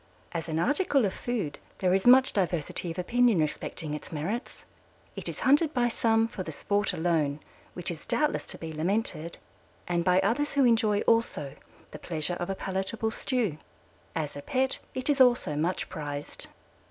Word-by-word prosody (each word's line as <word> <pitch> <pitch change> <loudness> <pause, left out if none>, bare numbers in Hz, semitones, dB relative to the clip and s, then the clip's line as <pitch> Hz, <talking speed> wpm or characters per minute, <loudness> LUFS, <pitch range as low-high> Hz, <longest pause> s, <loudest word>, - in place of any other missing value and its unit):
As 165 -1 -4
an 160 - -1
article 280 - +2
of 195 - -1
food 230 -12 -3 0.2
there 185 -1 +2
is 190 +4 +2
much 260 +1 +7
diversity 175 -3 -1
of 165 - -6
opinion 235 +4 +3
respecting 155 0 -2
its 150 - -7
merits. 175 - -4 0.5
It - - -4
is - - -7
hunted 290 +3 +4
by 240 -1 +3
some 225 -1 +2
for 200 - -7
the 165 - -5
sport 205 +7 0
alone, 160 -4 0 0.4
which 180 -1 -2
is 160 -2 -9
doubtless 300 -1 0
to - - -2
be 160 -1 -6
lamented, 170 0 -1 0.5
and 175 -1 +1
by 180 +1 +4
others 240 +9 0
who 280 -2 +4
enjoy 220 -3 +3
also 225 -11 +1 0.4
the - - -8
pleasure 160 0 -1
of 175 - -3
a 195 - -1
palatable 195 +4 -2
stew. 225 - -1 0.6
As 150 -3 -2
a 145 - -6
pet 260 - 0 0.2
it 255 +1 -2
is 290 -2 +4
also 245 - +4
much 165 +5 -1
prized. 145 -1 -6
190 Hz, 175 wpm, -28 LUFS, 160-240 Hz, 0.6 s, much